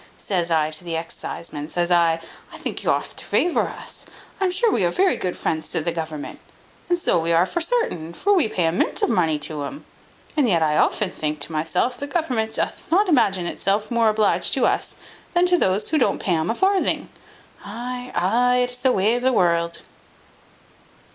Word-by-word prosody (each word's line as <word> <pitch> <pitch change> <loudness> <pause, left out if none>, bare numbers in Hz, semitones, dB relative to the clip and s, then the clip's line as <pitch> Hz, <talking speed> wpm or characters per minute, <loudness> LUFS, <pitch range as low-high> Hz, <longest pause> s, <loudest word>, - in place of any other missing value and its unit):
Says 175 -4 -1
I 155 -2 +2
to 155 +3 -4
the 170 -2 -4
exciseman, 160 -2 -5
says 175 +1 -1
I, 170 -1 +3 0.3
I - - -6
think - - -4
you - - 0
oft - - -1
to - - -7
favour 350 - +1
us; - - -7 0.3
I 390 - +1
am - - +2
sure 395 +5 +2
we - - +1
are 175 - +3
very 375 - +2
good 180 -1 -3
friends 160 -1 -2
to - - -1
the 170 +2 -1
government: 160 -3 -5 0.5
and 350 - +3
so 335 - +2
we 165 +1 -1
are 170 +2 +4
for 345 - -3
sartain, 330 - -1
for 405 - +1
we 350 - +4
pay 180 -5 -1
a 165 - +2
mint 175 - 0
of - - +2
money 165 -7 +2
to 150 0 -5
'um. 280 - -6 0.5
And 285 -6 +3
yet 170 -4 +3
I 150 -1 +2
often 195 +3 +1
think 150 0 -3
to 145 - -3
myself 180 +10 0
the 285 - -4
government 255 -9 -1
doth - - -3
not 385 +4 +3
imagine 195 - +3
itself 200 +6 -1
more 230 -2 +3
obliged 215 -1 +2
to - - +2
us, - - 0 0.4
than 350 0 +4
to 360 0 +3
those 190 +3 +1
that 310 - +3
don't 250 - +2
pay 180 - 0
'um 160 +1 -1
a 225 - 0
farthing. 385 +4 +1 0.5
Ay, 245 +4 -6
ay, 245 +7 +3
it 245 - -2
is 245 - -5
the 255 +1 +2
way 210 +1 +2
of 245 - -1
the 260 +1 +3
world." 170 -5 +1
195 Hz, 215 wpm, -22 LUFS, 165-255 Hz, 0.5 s, are